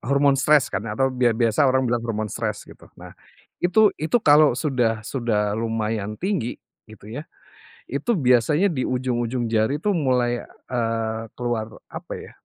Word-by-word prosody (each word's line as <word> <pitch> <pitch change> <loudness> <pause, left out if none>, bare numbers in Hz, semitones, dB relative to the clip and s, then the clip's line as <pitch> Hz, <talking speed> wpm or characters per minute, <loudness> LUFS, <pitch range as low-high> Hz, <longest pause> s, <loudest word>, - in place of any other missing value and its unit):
hormon 140 +1 +2
stres 150 0 +3
kan 100 +3 -3
atau 135 +6 0
bia 125 -3 +2
biasa 115 +4 +3
orang 130 0 +2
bilang 120 -1 0
hormon 110 -2 -3
stres - - -3
gitu. - - -16
Nah, - - -11 0.5
itu 205 +4 +4
itu 155 +10 +1
kalo 150 -2 +6
sudah 120 -7 0
sudah 105 -5 -1
lumayan 110 -2 -2
tinggi, 180 - -2 0.3
gitu 110 -1 -13
ya, 145 +8 -7 0.6
itu 140 - -3
biasanya 130 - +3
di 130 -5 -2
ujung-ujung 125 -1 -1
jari 110 +6 +2
tuh 205 +5 0
mulai, 125 -6 +1 0.3
eee, 115 -2 -1 0.2
keluar 120 -3 -2 0.2
apa - - -8
ya, - - -11
120 Hz, 155 wpm, -23 LUFS, 115-140 Hz, 0.6 s, kalo